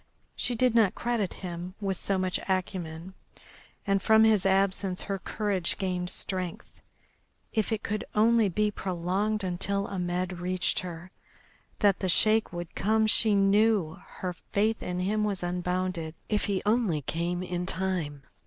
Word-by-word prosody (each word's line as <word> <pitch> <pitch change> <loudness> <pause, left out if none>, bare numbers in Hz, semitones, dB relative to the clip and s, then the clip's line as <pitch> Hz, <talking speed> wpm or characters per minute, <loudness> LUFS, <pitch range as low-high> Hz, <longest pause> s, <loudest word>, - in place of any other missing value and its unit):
She 245 - 0
did 250 0 +3
not 220 -5 +4
credit 235 -5 -1
him 175 +1 -6
with 195 -2 -1
so 195 +2 -1
much 185 -1 0
acumen. 180 -2 -3 0.7
And 195 -1 +2
from 220 +2 +5
his 215 -4 +4
absence 190 -1 +1
her 195 -1 -3
courage 200 -4 -1
gained 180 -2 -2
strength. 185 -3 -5 0.7
If 220 0 0
it 220 -1 -1
could 210 +1 -2
only 225 0 +4
be 210 +3 +1
prolonged 195 +3 -1
until 195 +2 -1
Ahmed 180 -1 -2
reached 180 0 0
her. 175 0 -7 0.7
That 200 -2 +4
the 185 - -1
Sheik 215 +5 +3
would 175 -1 -6
come 220 +1 +2
she 215 -1 +3
knew, 200 -3 +3
her 180 -1 -5
faith 215 +5 -1
in 180 0 -3
him 210 +3 +1
was 200 -4 -1
unbounded. 180 -2 -2
If 210 -1 +1
he 195 -2 -1
only 210 - +2
came 175 +5 -2
in 180 0 -3
time! 180 -8 -2
190 Hz, 150 wpm, -28 LUFS, 180-210 Hz, 0.7 s, from